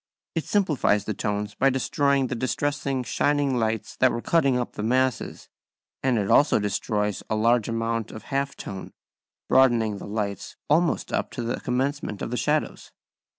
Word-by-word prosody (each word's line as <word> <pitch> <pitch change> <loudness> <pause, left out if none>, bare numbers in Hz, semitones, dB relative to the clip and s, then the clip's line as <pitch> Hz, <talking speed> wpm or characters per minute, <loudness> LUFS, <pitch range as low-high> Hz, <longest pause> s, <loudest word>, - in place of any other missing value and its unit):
It 165 - -2
simplifies 150 - +1
the 110 - -2
tones 105 +1 -2
by 135 +6 +3
destroying 140 +1 +1
the 125 - -3
distressing 135 +1 -1
shining 145 0 +1
lights 110 -1 -2
that 130 -1 +4
were 120 - -2
cutting 140 -6 +3
up 125 - -2
the - - -5
masses; 130 +2 0 0.5
and 130 -3 +2
it 100 -2 0
also 150 +1 +5
destroys 105 0 -1
a 110 - +1
large 115 +1 +2
amount 115 -1 -1
of 110 - -9
half 140 0 0
tone, 95 -1 -7 0.5
broadening 115 -6 +3
the - - -8
lights 100 -1 -4
almost 165 +3 +1
up - - 0
to 120 - -4
the 115 +1 -2
commencement 130 -4 -2
of - - -4
the - - -1
shadows. 150 +3 -1
125 Hz, 165 wpm, -25 LUFS, 110-140 Hz, 0.5 s, also